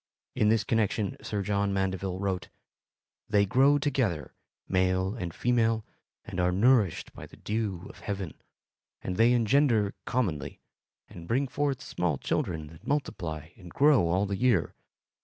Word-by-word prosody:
In 105 - +2
this 110 -1 +3
connection 110 -2 0
Sir 105 -2 -2
John 100 0 0
Mandeville 95 -1 -1
wrote: 95 -2 -2 0.8
They 105 -1 +4
grow 135 +6 +4
together, 130 - -1 0.3
male 95 +1 +1
and 90 -8 -4
female, 115 0 +1 0.4
and - - -5
are 90 0 +2
nourished 105 -1 +2
by - - -10
the - - -16
dew 105 -5 -3
of - - -13
heaven; 95 -6 -4 0.7
and 90 - -3
they 115 +3 +5
engender 120 -3 +3
commonly, 95 -13 -2 0.5
and 85 -1 -11
bring 135 +4 +1
forth 140 +1 -1
small 90 - -1
children 80 +2 -2
that 80 0 -15
multiply 80 - -2
and 90 -5 -12
grow 135 - +4
all 90 +4 +1
the 100 -1 -2
year. 120 -7 +2
100 Hz, 145 wpm, -28 LUFS, 90-120 Hz, 0.8 s, they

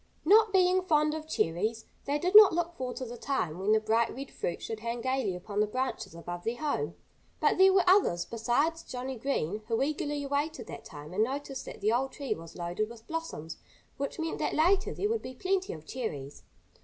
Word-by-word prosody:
Not 430 +4 +6
being 370 -1 +4
fond 305 -4 +2
of 310 0 -5
cherries, 220 - -1 0.2
they 285 +1 +1
did 360 +6 -1
not 425 -4 +11
look 345 0 -1
forward 255 -5 -4
to 260 - -4
the 240 0 -8
time 180 - -2
when 195 +3 +1
the 220 - +5
bright 225 +2 +1
red 270 +1 -7
fruit 170 - -3
should 225 -1 -5
hang 235 +2 -3
gaily 260 -6 0
upon 200 +3 -4
the 210 - +3
branches 255 -6 -3
above 175 +1 -6
their 230 +4 -1
home. 310 +8 -2 0.4
But - - +2
there 380 0 +8
were 375 -1 +3
others 360 - +4
besides 245 +9 0
Johnnie 255 -3 -6
Green 215 - -1
who 225 -1 0
eagerly 290 0 -2
awaited 285 -2 -2
that - - -9
time 150 +3 -10
and 210 +4 +3
noticed 270 +2 -4
that - - -9
the 215 - +2
old 260 +3 0
tree 275 -6 -2
was 165 -3 -11
loaded 175 +5 -2
with 230 -1 -12
blossoms, 320 - -5 0.4
which 280 0 -3
meant 325 0 -3
that - - -1
later 375 +5 +3
there 410 - -1
would 450 +1 0
be 255 - -8
plenty 375 +6 0
of 155 -1 -9
cherries. 150 - -5
260 Hz, 210 wpm, -30 LUFS, 215-320 Hz, 0.4 s, not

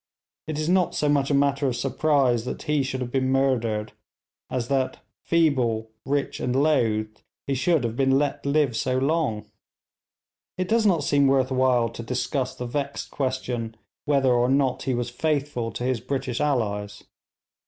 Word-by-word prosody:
It 155 -2 -3
is 155 0 -1
not 180 0 +2
so 150 - 0
much 140 -2 +2
a - - +1
matter 140 0 +2
of 125 - -1
surprise 135 -2 +1
that - - -5
he 150 -1 +1
should 130 -1 -3
have 120 -1 -4
been 130 0 0
murdered 115 -6 0 0.6
as 125 -2 -2
that, 135 -1 0 0.3
feeble, 125 -9 +1
rich, 140 +1 -1
and 125 0 -1
loathed, 110 -7 +1 0.2
he 140 - -1
should 140 +2 +2
have 115 -1 -2
been 135 +1 +3
let 145 0 -1
live 140 -3 +1
so 130 +3 0
long. 135 -6 0 1.1
It 185 0 -1
does 220 0 +3
not 170 -7 +2
seem 140 -1 +3
worth 135 -1 +2
while 130 -2 +3
to 115 - -8
discuss 125 +2 -2
the 125 - -5
vexed 140 +3 -4
question 125 -4 -3 0.3
whether 135 -3 +3
or 120 +1 +2
not 135 -1 +1
he 130 - -1
was 120 0 -3
faithful 140 -4 -1
to 115 - -5
his 125 -3 0
British 130 -1 -3
allies. 105 -8 -1
130 Hz, 170 wpm, -25 LUFS, 120-145 Hz, 1.1 s, been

